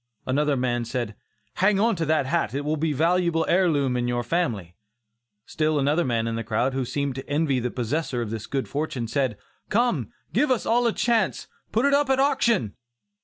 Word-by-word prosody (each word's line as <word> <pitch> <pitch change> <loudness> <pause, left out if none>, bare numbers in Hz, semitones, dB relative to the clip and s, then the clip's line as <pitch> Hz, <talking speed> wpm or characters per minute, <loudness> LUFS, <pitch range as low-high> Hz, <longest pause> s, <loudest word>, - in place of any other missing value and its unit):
Another 145 +2 +1
man 120 -1 0
said 120 -2 -3 0.4
"Hang 195 +1 +3
on 230 +1 +3
to 165 -2 -1
that 155 -3 +2
hat, 135 -5 -1
it 145 +1 -2
will 155 +1 0
be 155 +1 0
a - - -3
valuable 170 +1 +2
heir 180 +1 +3
loom 140 -5 +1
in 120 0 0
your 120 0 -1
family." 115 - -2 0.7
Still 155 0 0
another 145 +5 +2
man 115 -5 0
in 115 0 -2
the 115 - -3
crowd, 115 +5 0
who 130 -1 -1
seemed 140 +2 -2
to 135 +1 -8
envy 145 -3 +1
the 125 0 -2
possessor 125 +2 -2
of 115 -3 -3
this 110 -1 -5
good 135 -1 -2
fortune, 140 -5 -3
said, 125 -2 -1 0.3
"come, 210 - +1 0.2
give 280 +8 +2
us 255 -3 +1
all 240 +1 +3
a - - +3
chance; 225 -2 0 0.2
put 225 +5 +2
it 280 - +3
up 285 -1 +3
at 265 0 +3
auction!" 235 - +2
145 Hz, 210 wpm, -25 LUFS, 120-180 Hz, 0.7 s, Hang